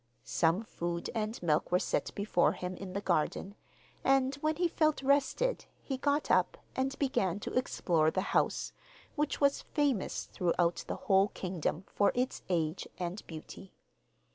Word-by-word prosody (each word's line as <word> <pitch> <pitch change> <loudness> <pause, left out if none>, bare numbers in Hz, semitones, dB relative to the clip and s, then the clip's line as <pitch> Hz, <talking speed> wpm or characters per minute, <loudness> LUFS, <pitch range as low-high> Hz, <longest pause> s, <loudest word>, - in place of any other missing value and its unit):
Some 170 +5 +2
food 170 -5 -4
and 220 0 -2
milk 155 -1 +1
were 180 - +5
set - - -1
before 200 -4 +2
him 180 0 -5
in 185 0 -7
the 200 - -2
garden, 185 +2 0 0.5
and 270 0 +3
when 310 +2 0
he 350 +2 +2
felt 310 -3 +1
rested 285 - +2
he 270 - -4
got 285 +2 +1
up, - - +3 0.2
and 270 +1 -1
began 200 - 0
to - - -5
explore 170 -10 +2
the 185 - 0
house, - - +1 0.4
which 300 -1 0
was 280 -1 +3
famous 280 -9 0
throughout 175 -1 0
the - - -2
whole 195 0 +5
kingdom 180 -3 -3
for 205 - +2
its 250 +1 -1
age 165 -1 0
and 180 +3 -3
beauty. 165 +4 -10
200 Hz, 155 wpm, -32 LUFS, 175-270 Hz, 0.5 s, were